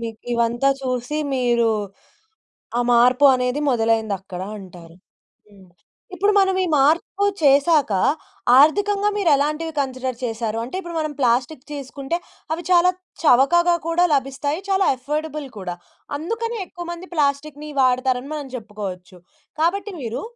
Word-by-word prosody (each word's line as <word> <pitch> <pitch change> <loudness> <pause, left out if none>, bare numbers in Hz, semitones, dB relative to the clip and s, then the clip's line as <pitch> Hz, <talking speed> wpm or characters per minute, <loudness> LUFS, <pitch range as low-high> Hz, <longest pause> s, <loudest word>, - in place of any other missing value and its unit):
మీకివంతా 235 +2 -1
చూసి 255 +3 -2 0.2
మీరు, 240 -3 +2 1.1
ఆ - - +2
మార్పు 250 +4 +5
అనేది 250 +2 -1
మొదలైందక్కడ 220 -6 -1 0.2
అంటారు. 175 -3 -13 0.5
హ్మ్. 195 -3 -19 0.5
ఇప్పుడు 405 +3 +2
మనం 385 -1 +2
ఈ - - -1
మార్పు 320 +8 +2 0.2
చేసాక, 285 -2 +4 0.7
ఆర్థికంగా 405 +7 +4
మీరేలాంటివి 310 -3 +1
కన్సిడర్ 255 -2 -3
చేసారు? 225 -1 -3
అంటే 260 +10 -6
ఇప్పుడు 345 -3 -7
మనం 310 -1 -2
ప్లాస్టిక్కు 255 +3 0
తీసుకుంటే, 280 +2 -4 0.4
అవి 330 +2 -3
చాలా 355 0 +5 0.3
చవకగా 340 +5 +4
కూడా 340 +2 +3
లభిస్తాయి 280 +4 -1
చాలా 385 0 +3
అఫర్డబుల్ 300 +2 -4
కూడా. 180 -2 -5 0.4
అందుకని 455 +8 -3
ఎక్కువ 350 -1 -9
మంది 345 +2 -9
ప్లాస్టికుని 295 0 -1
వాడతారని 255 +1 +1
మనం 290 -3 -5
చెప్పుకోవచ్చు. 200 -5 -8 0.4
కాబట్టి 395 +6 0
మీరు, 235 -3 -4
275 Hz, 120 wpm, -21 LUFS, 235-325 Hz, 1.1 s, మార్పు